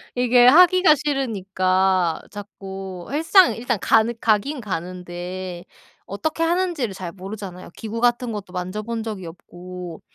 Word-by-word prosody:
이게 245 Hz, 0 st, +4 dB
하기가 360 Hz, +3 st, +7 dB
싫으니까 190 Hz, -, 0 dB
자꾸 195 Hz, -3 st, -8 dB
헬스장 330 Hz, +5 st, +5 dB
일단 240 Hz, -2 st, -2 dB
가는 225 Hz, +1 st, +3 dB
가기는 235 Hz, +6 st, +1 dB
가는데 180 Hz, -1 st, -6 dB, 0.4 s
어떻게 315 Hz, +11 st, -3 dB
하는지를 335 Hz, -, 0 dB
잘 185 Hz, -3 st, -6 dB
모르잖아요. 190 Hz, -1 st, -8 dB
기구 225 Hz, 0 st, -5 dB
같은 240 Hz, 0 st, +1 dB
것도 200 Hz, -4 st, -7 dB
만져 185 Hz, +3 st, -4 dB
본 230 Hz, +1 st, -4 dB
적이 210 Hz, -5 st, -6 dB
없고 175 Hz, 0 st, -10 dB
205 Hz, 295 characters per minute, -22 LUFS, 185-245 Hz, 0.4 s, 하기가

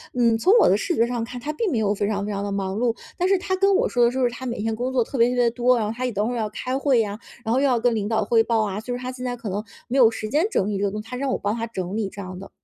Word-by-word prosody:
嗯， 235 Hz, -2 st, +3 dB
从 370 Hz, -, +4 dB
我 -, -, +6 dB
的 -, -, +5 dB
视 350 Hz, -5 st, -1 dB
觉 230 Hz, -, +3 dB
上 240 Hz, -1 st, -2 dB
看， 245 Hz, +2 st, -6 dB
他 300 Hz, +5 st, -4 dB
并 405 Hz, +2 st, -1 dB
没 235 Hz, -, 0 dB
有 210 Hz, -1 st, +1 dB
非 205 Hz, 0 st, -1 dB
常 205 Hz, -1 st, -1 dB
非 210 Hz, -, -3 dB
常 200 Hz, 0 st, -3 dB
地 205 Hz, -, -3 dB
忙 195 Hz, -1 st, -2 dB
碌， 230 Hz, +1 st, +1 dB, 0.2 s
但 360 Hz, +1 st, +2 dB
是 390 Hz, -, +4 dB
他 375 Hz, 0 st, -1 dB
跟 390 Hz, +1 st, +3 dB
我 -, -, +2 dB
说 245 Hz, -, +2 dB
的 -, -, +4 dB
就 260 Hz, +1 st, -1 dB
是 245 Hz, -, +3 dB
他 260 Hz, +1 st, -7 dB
每 240 Hz, -, -3 dB
天 225 Hz, 0 st, -1 dB
工 250 Hz, +3 st, -2 dB
作 245 Hz, -3 st, +3 dB
特 270 Hz, -, -9 dB
别 235 Hz, 0 st, +4 dB
特 250 Hz, -, -1 dB
别 245 Hz, -1 st, +3 dB
多， 245 Hz, +1 st, +3 dB
然 220 Hz, -, 0 dB
后 220 Hz, -, -3 dB
他 255 Hz, +1 st, -2 dB
也 250 Hz, -, -1 dB
等 210 Hz, +1 st, -1 dB
会 245 Hz, -, -2 dB
儿 -, -, -3 dB
要 215 Hz, -2 st, -1 dB
开 255 Hz, +4 st, -4 dB
会 270 Hz, -3 st, +2 dB
呀， 205 Hz, -1 st, -4 dB, 0.2 s
然 225 Hz, +1 st, 0 dB
后 260 Hz, -, +3 dB
又 -, -, +3 dB
要 245 Hz, -3 st, +2 dB
跟 240 Hz, 0 st, +2 dB
领 210 Hz, -2 st, -1 dB
导 220 Hz, -1 st, +1 dB
汇 225 Hz, +2 st, +4 dB
报 225 Hz, -2 st, +1 dB
啊， 200 Hz, 0 st, -3 dB
就 245 Hz, -, -6 dB
是 -, -, -5 dB
他 255 Hz, 0 st, -4 dB
现 255 Hz, 0 st, -8 dB
在 245 Hz, -1 st, -3 dB
可 235 Hz, -, -8 dB
能 205 Hz, +3 st, -3 dB, 0.2 s
没 250 Hz, -, -3 dB
有 230 Hz, -3 st, +8 dB
时 220 Hz, -1 st, -5 dB
间 300 Hz, +8 st, +2 dB
整 195 Hz, -, 0 dB
理 205 Hz, -2 st, -1 dB
这 200 Hz, -, -1 dB
个 200 Hz, -, +2 dB
东 210 Hz, +1 st, -4 dB
西， 215 Hz, -, -15 dB
他 250 Hz, -, -6 dB
让 275 Hz, +1 st, -1 dB
我 -, -, 0 dB
帮 205 Hz, +2 st, -1 dB
他 230 Hz, 0 st, -3 dB
整 185 Hz, -2 st, -4 dB
理 210 Hz, -3 st, -1 dB
这 200 Hz, -, -8 dB
样 185 Hz, -1 st, -7 dB
的。 195 Hz, -, -10 dB
235 Hz, 410 characters per minute, -23 LUFS, 210-255 Hz, 0.2 s, 有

